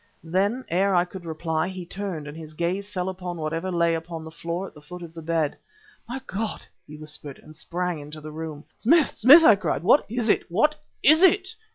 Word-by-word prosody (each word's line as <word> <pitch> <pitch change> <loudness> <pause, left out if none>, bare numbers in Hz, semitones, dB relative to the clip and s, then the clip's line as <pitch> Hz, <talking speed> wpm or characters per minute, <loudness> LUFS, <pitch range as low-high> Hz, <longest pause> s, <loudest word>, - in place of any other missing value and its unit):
Then, 200 +9 0
ere 190 +3 +2
I 175 0 +4
could 180 0 -10
reply, 160 0 -2
he 185 -2 -6
turned, 180 -5 -5
and 150 - -8
his 155 -1 -10
gaze 185 +5 -2
fell 185 -3 -3
upon 180 -2 -5
whatever 165 +4 -3
lay 170 -1 +2
upon 165 0 -5
the 160 - -9
floor 170 +3 -4
at - - -11
the 150 - -14
foot 180 +4 -9
of 165 -1 -10
the 165 - -8
bed. 160 -2 0 0.5
"My 255 +2 -3
God!" 210 +2 -4 0.2
he 150 - -10
whispered 150 -2 -9
and 155 - -15
sprang 175 +1 -3
into 150 +1 -9
the 155 0 -9
room. 155 -1 -6
"Smith! 310 +6 +3
Smith!" 285 +9 +8
I 220 - +9
cried, 195 - -2
"what 240 +10 +5
is 235 0 -1
it? 210 - +2
what 300 - +3 0.3
is 310 +4 +6
it?" 380 0 +5
175 Hz, 215 wpm, -25 LUFS, 160-200 Hz, 0.5 s, I